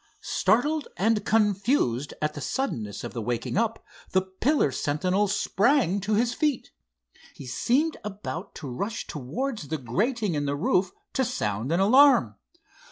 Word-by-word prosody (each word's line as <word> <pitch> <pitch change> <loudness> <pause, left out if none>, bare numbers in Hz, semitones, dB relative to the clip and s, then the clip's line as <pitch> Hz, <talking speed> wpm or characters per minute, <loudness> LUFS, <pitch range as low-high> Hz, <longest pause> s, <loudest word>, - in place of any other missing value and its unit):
Startled 295 +6 +1
and 215 +1 +2
confused 200 - +1
at 150 0 0
the 145 - -7
suddenness 115 - -3
of 120 - -6
the 120 - -4
waking 120 +2 -2
up, 225 +2 0 0.3
the 185 0 +3
pillar 190 - +1
sentinel 180 +10 0
sprang 205 - +2
to 210 +2 0
his 235 +2 +1
feet. 295 0 -1 0.6
He 140 - -10
seemed 270 - +1
about 200 -2 -6
to 145 - -7
rush 200 - -4
towards 170 - -4
the 160 - -2
grating 205 - -1
in 145 -1 -1
the 140 - 0
roof 180 +5 +1 0.2
to 265 - +1
sound 115 - -2
an 170 - +2
alarm. 265 +8 +6
200 Hz, 150 wpm, -26 LUFS, 145-240 Hz, 0.6 s, alarm